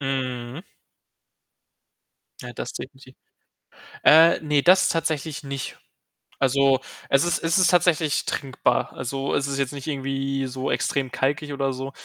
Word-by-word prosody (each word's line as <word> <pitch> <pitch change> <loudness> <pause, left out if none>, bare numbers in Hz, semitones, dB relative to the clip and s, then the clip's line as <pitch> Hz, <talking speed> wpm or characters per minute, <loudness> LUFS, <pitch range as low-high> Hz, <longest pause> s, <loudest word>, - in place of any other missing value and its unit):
Mhm. 130 +1 -4 1.8
Ja, 120 - -8
das 120 - -6
definitiv. 130 -1 -10 0.9
Äh, 165 +2 +7
ne, 150 -2 +1
das 185 +4 +5
tatsächlich 155 -2 -2
nicht. 140 -1 -6 0.6
Also, 135 0 +3 0.3
es 135 +3 +4
ist 175 -1 +1
es 165 +2 +2
ist 185 - +4
tatsächlich 170 -4 +2
trinkbar. 135 -2 -1
Also, 135 +2 -3
es 140 - 0
ist 140 0 -3
jetzt 140 -1 -1
nicht 140 -2 -8
irgendwie 135 -1 -2
so 130 +1 -4
extrem 135 -2 -1
kalkig 145 +2 -1
oder 135 -1 -1
so. 130 +1 -6
135 Hz, 135 wpm, -23 LUFS, 135-150 Hz, 1.8 s, Äh